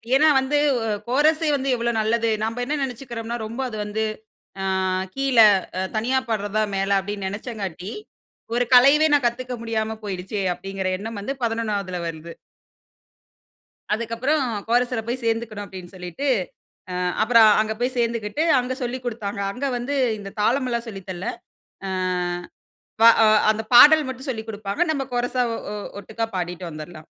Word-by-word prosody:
ஏனா, 305 Hz, +3 st, +5 dB
வந்து 265 Hz, +3 st, 0 dB, 0.5 s
கோரஸ்யே 305 Hz, +5 st, +3 dB
வந்து, 275 Hz, 0 st, -2 dB
எவ்வளவு 235 Hz, -1 st, -1 dB
நல்லது. 230 Hz, +1 st, +1 dB
நாம்ப 225 Hz, +2 st, -2 dB
என்ன 300 Hz, +4 st, -1 dB
நெனச்சுக்குறோம்னா, 235 Hz, -2 st, -5 dB
ரொம்ப 230 Hz, +5 st, -5 dB
அது 215 Hz, -, -6 dB
வந்து, 210 Hz, +1 st, -2 dB, 0.6 s
அ, -, -, -3 dB, 0.5 s
கீழ, 270 Hz, -2 st, 0 dB, 0.4 s
அ 185 Hz, -, 0 dB
தனியா 240 Hz, +5 st, +1 dB
பாட்றதா 215 Hz, -1 st, 0 dB
மேல, 195 Hz, 0 st, -1 dB
அப்டினு 200 Hz, 0 st, -5 dB
நெனச்சங்காட்டி, 200 Hz, -3 st, -5 dB, 0.6 s
ஒரு 245 Hz, -, +2 dB
கலையவே 280 Hz, +5 st, +7 dB
நான், 285 Hz, -4 st, +3 dB
கத்துக்க 250 Hz, +1 st, -1 dB
முடியாம 220 Hz, -1 st, -2 dB
போய்டுச்சே! 195 Hz, 0 st, -4 dB
அப்டிங்கிற 195 Hz, +1 st, -5 dB
எண்ணம் 225 Hz, 0 st, -6 dB
வந்து, 270 Hz, +7 st, -3 dB
11 210 Hz, -5 st, -2 dB
வருது. 165 Hz, +1 st, -7 dB, 1.6 s
அதுக்கப்புறம் 235 Hz, +7 st, 0 dB, 0.3 s
கோரஸ்ல 245 Hz, 0 st, +2 dB
போய் 245 Hz, +2 st, -3 dB
சேந்துக்கணு 225 Hz, -2 st, -2 dB
அப்படினு 185 Hz, -2 st, -10 dB
சொல்லிட்டு, 180 Hz, -, -5 dB, 0.7 s
ஆ -, -, -4 dB, 0.3 s
அப்புறம் 225 Hz, -1 st, +6 dB
அங்க 220 Hz, 0 st, 0 dB
போய் 255 Hz, +1 st, 0 dB
சேந்துக்கிட்டு 230 Hz, +2 st, -1 dB, 0.2 s
அங்க 250 Hz, +1 st, -3 dB
சொல்லிக் 250 Hz, +1 st, -4 dB
குடுத்தாங்க. 215 Hz, -4 st, -4 dB
அங்க 255 Hz, +6 st, -3 dB
வந்து 250 Hz, +4 st, -3 dB, 0.2 s
இந்த 195 Hz, -1 st, -8 dB
தாளமெல்லாம் 240 Hz, +1 st, +1 dB
சொல்லி 195 Hz, -3 st, -7 dB
தரல 185 Hz, +1 st, -5 dB, 0.6 s
ஆ. -, -, -3 dB, 1.1 s
வ -, -, +6 dB, 0.5 s
அந்த 220 Hz, +1 st, +1 dB
பாடல் 300 Hz, +4 st, +9 dB
மட்டும் 260 Hz, +2 st, -7 dB
சொல்லிக் 225 Hz, -3 st, -4 dB
குடுப்பாங்க. 205 Hz, -, -4 dB
நமம் 275 Hz, -4 st, -1 dB
கோரஸ்ஸா 245 Hz, +1 st, 0 dB, 0.5 s
ஒட்டுக்கா 220 Hz, +3 st, -4 dB
பாடிட்டு 180 Hz, 0 st, -3 dB
வந்துரலா. 155 Hz, +1 st, -9 dB
230 Hz, 140 wpm, -23 LUFS, 205-250 Hz, 1.6 s, பாடல்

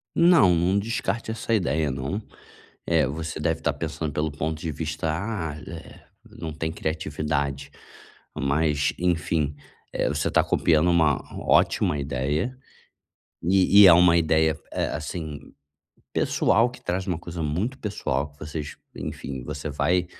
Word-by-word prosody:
Não, 165 Hz, -, +6 dB
não 90 Hz, +4 st, +2 dB
descarte 115 Hz, +1 st, -2 dB
essa 115 Hz, +1 st, -2 dB
ideia, 80 Hz, -8 st, +1 dB
não. 65 Hz, +11 st, -3 dB, 0.7 s
Eh, 80 Hz, -5 st, +3 dB
você 80 Hz, +4 st, -5 dB
deve -, -, 0 dB
estar -, -, +1 dB
pensando 75 Hz, -2 st, -4 dB
pelo 75 Hz, +1 st, -1 dB
ponto 80 Hz, +2 st, -3 dB
de 80 Hz, 0 st, -3 dB
vista: 80 Hz, +1 st, -3 dB
"Ah, 90 Hz, -4 st, -3 dB
eh, 85 Hz, 0 st, -10 dB, 0.2 s
não 80 Hz, -, -7 dB
tem 80 Hz, +1 st, -3 dB
criatividade". 75 Hz, -3 st, -2 dB, 0.6 s
Mas, 75 Hz, +1 st, +1 dB
enfim, 80 Hz, -4 st, 0 dB, 0.4 s
eh, -, -, 0 dB
você -, -, -1 dB
tá -, -, +4 dB
copiando 80 Hz, +1 st, +3 dB
uma 80 Hz, -4 st, +4 dB, 0.3 s
ótima 75 Hz, -, +3 dB
ideia. 70 Hz, -, -2 dB, 0.9 s
E 95 Hz, +3 st, +6 dB
e 100 Hz, -, +10 dB
é 90 Hz, -, +10 dB
uma 85 Hz, 0 st, +6 dB
ideia, 80 Hz, -1 st, +2 dB
eh, -, -, 0 dB
assim, 75 Hz, -1 st, -5 dB, 0.7 s
pessoal, 120 Hz, +2 st, +2 dB
que 125 Hz, -, -14 dB
traz 95 Hz, +2 st, -2 dB
uma 90 Hz, -3 st, -1 dB
coisa 85 Hz, -1 st, -6 dB
muito 95 Hz, -, -2 dB
pessoal 75 Hz, -, -2 dB
que 70 Hz, -, -27 dB
vocês, 75 Hz, 0 st, -6 dB, 0.2 s
enfim, 65 Hz, -2 st, -5 dB
você 75 Hz, +4 st, -5 dB
vai, 90 Hz, +5 st, +1 dB
80 Hz, 145 wpm, -25 LUFS, 75-90 Hz, 0.9 s, e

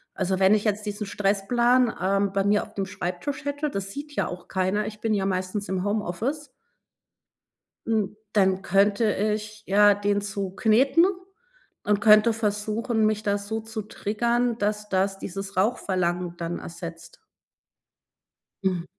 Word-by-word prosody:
Also, 190 Hz, 0 st, -1 dB
wenn 195 Hz, +2 st, +5 dB
ich 210 Hz, -, 0 dB
jetzt 210 Hz, 0 st, -1 dB
diesen 205 Hz, +1 st, -3 dB
Stressplan, 225 Hz, +5 st, +2 dB
ähm, 195 Hz, +1 st, +1 dB
bei 195 Hz, 0 st, +1 dB
mir 205 Hz, +1 st, +2 dB
auf 215 Hz, -, -14 dB
dem 195 Hz, -2 st, -3 dB
Schreibtisch 200 Hz, +11 st, -4 dB
hätte 285 Hz, +1 st, -2 dB
das 195 Hz, -6 st, -4 dB
sieht 290 Hz, +5 st, -7 dB
ja -, -, 0 dB
auch 180 Hz, 0 st, -8 dB
keiner, 190 Hz, +3 st, 0 dB
ich 215 Hz, 0 st, -8 dB
bin 225 Hz, -1 st, 0 dB
ja 195 Hz, -2 st, 0 dB
meistens 190 Hz, +2 st, -2 dB
im 185 Hz, -1 st, -1 dB
Homeoffice. 215 Hz, -, -2 dB, 1.4 s
Hm, 215 Hz, -3 st, 0 dB, 0.2 s
dann 190 Hz, -2 st, +2 dB
könnte 200 Hz, +3 st, +3 dB
ich 215 Hz, +1 st, -2 dB
ja 205 Hz, +1 st, +6 dB
den 205 Hz, 0 st, 0 dB
zukneten 215 Hz, -, +2 dB, 0.8 s
und 205 Hz, 0 st, +2 dB
könnte 215 Hz, +2 st, +6 dB
versuchen, 220 Hz, +1 st, 0 dB
mich 215 Hz, 0 st, 0 dB
da 205 Hz, -1 st, +1 dB
so 210 Hz, +2 st, -4 dB
zu 220 Hz, 0 st, -6 dB
triggern, 235 Hz, +3 st, -1 dB
dass 210 Hz, 0 st, -1 dB
das 195 Hz, 0 st, 0 dB
dieses 195 Hz, +1 st, -6 dB
Rauchverlangen 180 Hz, -4 st, 0 dB
dann 170 Hz, 0 st, -4 dB
ersetzt. 170 Hz, -, -9 dB, 1.5 s
Mhm. 180 Hz, -3 st, 0 dB
205 Hz, 145 wpm, -25 LUFS, 195-220 Hz, 1.5 s, ja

